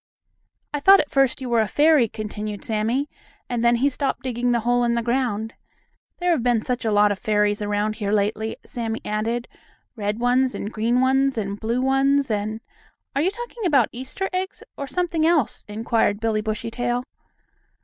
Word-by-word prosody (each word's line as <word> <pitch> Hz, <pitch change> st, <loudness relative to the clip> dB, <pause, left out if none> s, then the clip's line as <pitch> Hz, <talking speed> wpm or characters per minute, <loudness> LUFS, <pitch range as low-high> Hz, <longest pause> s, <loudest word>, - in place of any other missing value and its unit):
"I 295 Hz, -, -1 dB
thought 390 Hz, +7 st, +7 dB
at 295 Hz, -, -1 dB
first 270 Hz, -1 st, +2 dB
you 255 Hz, -, -4 dB
were 235 Hz, -1 st, +3 dB
a 215 Hz, -, 0 dB
fairy," 295 Hz, +1 st, +4 dB
continued 210 Hz, -1 st, -6 dB
Sammie, 225 Hz, +6 st, 0 dB, 0.4 s
and 240 Hz, -2 st, -2 dB
then 235 Hz, 0 st, +5 dB
he 255 Hz, +4 st, +2 dB
stopped 275 Hz, 0 st, -1 dB
digging 245 Hz, -1 st, -1 dB
the 235 Hz, -1 st, +1 dB
hole 245 Hz, +1 st, +2 dB
in 235 Hz, 0 st, +1 dB
the 235 Hz, -, 0 dB
ground. 235 Hz, -3 st, -1 dB, 0.6 s
"There 355 Hz, 0 st, +1 dB
have 325 Hz, -, +2 dB
been 240 Hz, -2 st, +1 dB
such 250 Hz, 0 st, -2 dB
a 225 Hz, -, 0 dB
lot 205 Hz, 0 st, +4 dB
of 200 Hz, -, -3 dB
fairies 210 Hz, -1 st, +1 dB
around 210 Hz, +1 st, -1 dB
here 205 Hz, -3 st, -2 dB
lately," 215 Hz, +1 st, 0 dB
Sammie 225 Hz, -2 st, -4 dB
added. 225 Hz, +3 st, -2 dB, 0.5 s
"Red 210 Hz, -1 st, -2 dB
ones, 250 Hz, +2 st, +2 dB
and 210 Hz, -, -5 dB
green 235 Hz, +3 st, +1 dB
ones, 270 Hz, 0 st, +2 dB
and 200 Hz, -1 st, -3 dB
blue 230 Hz, +3 st, -1 dB
ones, 270 Hz, 0 st, +2 dB
and 215 Hz, +1 st, -2 dB, 0.3 s
" -, -, -40 dB
"Are 280 Hz, -, +2 dB
you 350 Hz, -, +3 dB
talking 475 Hz, +2 st, -7 dB
about 280 Hz, -, +3 dB
Easter 260 Hz, +10 st, -4 dB
eggs 375 Hz, +1 st, -3 dB
or 280 Hz, -, -5 dB
something 335 Hz, +2 st, -1 dB
else?" 320 Hz, -7 st, +2 dB
inquired 215 Hz, -1 st, 0 dB
Billie 220 Hz, -1 st, 0 dB
Bushytail. 235 Hz, +3 st, -2 dB
240 Hz, 185 wpm, -23 LUFS, 215-270 Hz, 0.6 s, thought